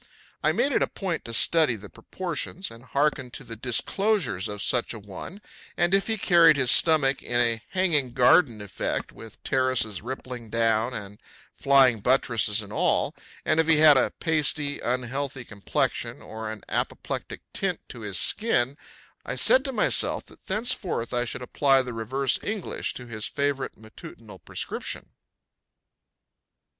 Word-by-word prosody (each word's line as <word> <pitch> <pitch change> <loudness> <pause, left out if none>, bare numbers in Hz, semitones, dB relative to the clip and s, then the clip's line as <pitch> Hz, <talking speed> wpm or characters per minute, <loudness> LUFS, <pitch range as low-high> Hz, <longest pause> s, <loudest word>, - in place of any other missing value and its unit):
I - - +4
made 280 - +1
it - - +1
a - - +2
point 185 -5 -4
to 115 - -6
study 155 -1 +3
the 100 -1 -10
proportions 180 - -5
and 115 +1 -13
hearken 140 -1 0
to - - -11
the 115 - -8
disclosures 125 - 0
of 105 -1 -5
such 120 -1 +1
a - - -7
one, 105 - -10 0.3
and 175 +1 +2
if 195 0 +3
he 220 -1 0
carried 170 -5 +5
his 130 -2 +4
stomach 145 -5 +4
in 120 0 -1
a 115 -2 +1
hanging 165 -8 +1
garden 125 -2 +4
effect, 100 -4 -3
with 115 -1 -14
terraces 130 -7 +1
rippling 125 -1 -7
down 115 +2 +1
and 105 0 -8 0.3
flying 135 -4 +4
buttresses 115 -3 +1
and 100 0 -11
all; - - +1 0.3
and 155 - +2
if 160 - +3
he 165 -1 +5
had 150 -1 +8
a 130 - +3
pasty, 150 -3 0
unhealthy 130 +2 -3
complexion 100 -2 -2
or 110 0 -7
an 110 -2 -9
apoplectic - - -3
tint - - -1
to 120 - -9
his 100 -4 -3
skin 140 - +1 0.4
I - - -4
said 260 - +4
to 270 - -2
myself 255 - +1
that - - -19
thenceforth 190 - -2
I 120 0 +1
should 120 +2 -5
apply 135 +1 +3
the 125 -1 -6
reverse 125 +4 0
English 205 -2 -4
to 125 - -7
his 110 -2 -6
favorite 140 -2 -2
matutinal 110 0 -13
prescription. - - -5
130 Hz, 155 wpm, -26 LUFS, 115-155 Hz, 0.4 s, had